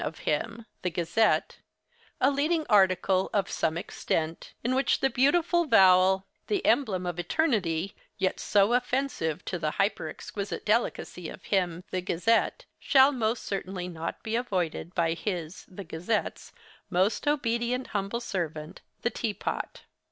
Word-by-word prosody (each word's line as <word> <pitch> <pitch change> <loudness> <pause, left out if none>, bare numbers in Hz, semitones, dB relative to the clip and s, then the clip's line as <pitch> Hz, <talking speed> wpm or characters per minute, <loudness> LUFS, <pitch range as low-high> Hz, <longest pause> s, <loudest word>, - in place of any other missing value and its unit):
of 155 - -4
him 225 +9 -1 0.2
(the 180 - 0
"Gazette") 175 +6 +1 0.6
a 265 - +4
leading 305 +3 +1
article, 190 -2 +3
of 200 -3 +2
some 160 +1 0
extent, 165 -1 -3
in 245 +2 +1
which 265 +1 +2
the 270 - +1
beautiful 340 +6 +3
vowel—the 190 - +3
emblem 190 -10 +2
of 175 -1 -3
Eternity—yet 190 - -1
so 205 +2 +3
offensive 245 - -1
to 175 - -3
the 155 -1 0
hyper 200 +2 +1
exquisite 200 -1 -6
delicacy 210 -5 -1
of 180 - -10
him 180 -1 0
(the 185 - -1
"Gazette") 185 +6 +1
shall 270 +1 +5
most 230 -3 -1
certainly 190 -2 -4
not 165 -2 -5
be 220 0 -2
avoided 185 -7 -2
by 165 -1 +2
his 170 -2 -5
(the 195 +2 -8
"Gazette's") 175 +6 -3 0.4
most 190 +9 +1
obedient, 250 -3 0
humble 200 +3 -2
servant, 165 -5 -4 0.2
the 240 - +1
"Tea 220 -4 -2
Pot." - - -4
195 Hz, 135 wpm, -28 LUFS, 175-240 Hz, 0.6 s, shall